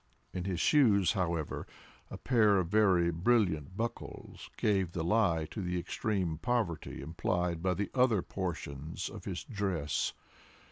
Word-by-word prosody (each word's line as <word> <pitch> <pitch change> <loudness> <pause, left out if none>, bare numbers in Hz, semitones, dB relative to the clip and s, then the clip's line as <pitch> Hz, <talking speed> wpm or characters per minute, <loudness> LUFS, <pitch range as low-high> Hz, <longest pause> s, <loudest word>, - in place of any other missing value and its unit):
In 90 -1 -3
his 95 -3 -2
shoes, 105 - +4
however, 85 -6 -2 0.4
a - - -7
pair 110 -6 +3
of 90 -3 0
very 95 -5 +4
brilliant 90 - +1
buckles 115 +1 -5
gave 95 -5 +1
the 85 - -2
lie 85 -4 +2
to 105 - -4
the 90 -1 -2
extreme 90 -3 -2
poverty 105 - -2
implied 85 +2 -1
by 90 0 +1
the 100 +1 -3
other 125 -7 +3
portions 80 -4 -4
of - - -10
his - - -4
dress. 95 -8 -1
90 Hz, 140 wpm, -32 LUFS, 85-105 Hz, 0.4 s, shoes